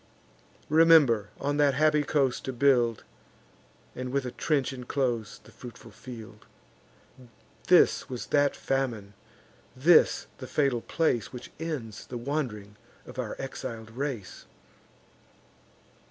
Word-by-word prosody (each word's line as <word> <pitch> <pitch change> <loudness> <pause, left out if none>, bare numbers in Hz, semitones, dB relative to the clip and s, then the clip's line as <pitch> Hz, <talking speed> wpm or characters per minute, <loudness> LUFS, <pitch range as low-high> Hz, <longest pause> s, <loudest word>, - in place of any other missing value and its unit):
Remember 155 -9 +5
on 145 +1 -1
that 145 -2 +3
happy 150 +1 +3
coast 140 -3 0
to 130 - -3
build, 120 -3 +2 0.9
And 125 0 -5
with 140 -1 -1
a 125 - -4
trench 140 -2 0
inclose 125 -4 -2
the - - -17
fruitful 120 -2 -12
field.' 110 -1 -11 1.2
This - - +4
was 125 -2 -5
that 145 -1 +3
famine, 120 -7 -2 0.6
this 155 +6 +4
the 130 - -7
fatal 135 -5 +1
place 140 -9 0
Which 125 - -9
ends 135 -11 -5
the 125 - -5
wand'ring 120 -6 -4 0.3
of - - -10
our - - -3
exil'd 110 -1 -6
race. 125 -4 -5
130 Hz, 115 wpm, -28 LUFS, 115-145 Hz, 1.2 s, Remember